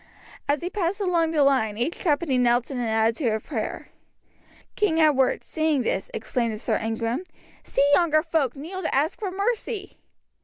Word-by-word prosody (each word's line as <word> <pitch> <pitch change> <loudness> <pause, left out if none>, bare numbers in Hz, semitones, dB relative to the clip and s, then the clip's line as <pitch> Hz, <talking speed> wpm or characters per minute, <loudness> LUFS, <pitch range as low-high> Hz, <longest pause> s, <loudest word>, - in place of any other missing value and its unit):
As 285 0 +2
he 355 - -3
passed 385 0 -1
along 345 -4 +1
the 310 -3 +3
line 220 -7 +2
each 245 +9 -2
company 295 -5 +1
knelt 245 +1 +2
in 260 - -3
an 240 - -1
attitude 225 +2 +1
of 220 - -3
prayer. 230 -8 -4 0.9
King 350 -6 +1
Edward, 290 -5 +3
seeing 310 -4 0
this, - - -2
exclaimed 245 - -2
to - - -5
Sir - - 0
Ingram: 230 +6 -2 0.4
"See 280 - +1
yonder 310 0 +4
folk 315 -6 0
kneel 340 +7 -6
to - - -1
ask 295 +4 +1
for 405 - -2
mercy!" 405 +1 -3
290 Hz, 170 wpm, -25 LUFS, 240-340 Hz, 0.9 s, yonder